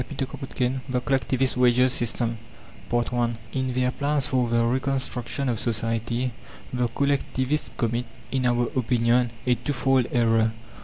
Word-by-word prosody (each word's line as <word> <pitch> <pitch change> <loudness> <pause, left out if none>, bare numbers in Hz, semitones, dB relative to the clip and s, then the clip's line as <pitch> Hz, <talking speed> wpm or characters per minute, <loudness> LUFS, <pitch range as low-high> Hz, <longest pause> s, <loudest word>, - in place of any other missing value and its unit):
CHAPTER 135 - 0 0.3
XIII 130 +1 +1
THE 125 -1 +1
COLLECTIVIST 130 0 0
WAGES 125 +1 +4
SYSTEM 115 -2 0 0.5
I 120 0 +1 0.2
In 130 -1 -1
their 125 0 +2
plans 140 0 +1
for 125 -2 +1
the 115 0 +2
reconstruction 130 0 -1
of 120 -4 0
society 115 +2 -1 0.4
the 125 -1 +1
collectivists 140 +2 0
commit, 120 +1 0 0.3
in 130 -2 +1
our 120 0 +2
opinion, 120 0 +2 0.2
a 125 - +4
twofold 130 +1 +1
error. 115 -2 +3
125 Hz, 135 wpm, -25 LUFS, 120-130 Hz, 0.5 s, WAGES